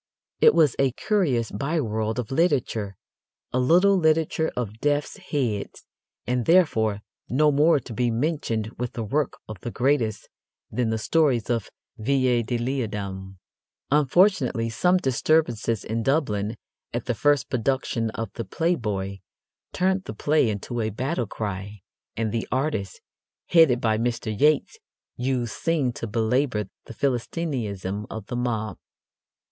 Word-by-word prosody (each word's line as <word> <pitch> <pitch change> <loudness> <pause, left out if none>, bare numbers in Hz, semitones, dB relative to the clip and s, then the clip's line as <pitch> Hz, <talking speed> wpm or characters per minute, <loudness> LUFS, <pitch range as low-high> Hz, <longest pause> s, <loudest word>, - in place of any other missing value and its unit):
It - - +6
was 155 -6 +4
a 135 -2 +3
curious 140 - 0
by 140 +10 -1
world 110 -3 -1
of 125 -2 -3
literature, 130 - +1 0.6
a 130 - +2
little 180 +10 +5
literature 160 -2 +2
of 110 -3 -3
death's 145 +5 0
heads, 130 - -3 0.4
and, 125 -1 0
therefore, 110 - +3 0.3
no 150 +4 +4
more 150 +2 +4
to 120 - -9
be 120 +2 +1
mentioned 115 -4 -1
with 125 -1 -3
the 115 - -3
work 140 +6 0
of 110 -3 -8
the 120 - -5
greatest 120 -4 0 0.4
than 125 -2 0
the 110 - 0
stories 125 -2 +2
of 115 -5 -1 0.3
Villiers 125 -1 +1
de 120 - 0
l'Isle 125 +1 -1
Adam. 95 -2 -6 0.5
Unfortunately, 140 - +3
some 180 +10 +3
disturbances 125 - +1
in 115 +1 -2
Dublin 110 -6 0 0.4
at 120 0 -3
the 125 - 0
first 145 +3 +2
production 125 -2 -1
of 115 - -4
The 115 - -4
Playboy 105 - -1 0.5
turned 190 +1 0
the 110 - -6
play 145 +1 +2
into 110 +3 -3
a 110 - 0
battle 125 +3 -2
cry, 100 -1 -5 0.4
and 110 -1 -1
the 115 0 -2
artists, 130 -7 -1 0.5
headed 160 -8 +5
by 110 -2 +1
Mr. 115 -2 -2
Yeats, 155 - +2 0.4
used 125 -2 -1
Synge 155 -7 0
to 115 - -4
belabour 115 0 0 0.2
the 115 - -10
Philistinism 115 - -2
of 110 -2 -6
the 120 - -5
mob. 115 -4 -2
120 Hz, 140 wpm, -25 LUFS, 110-145 Hz, 0.6 s, It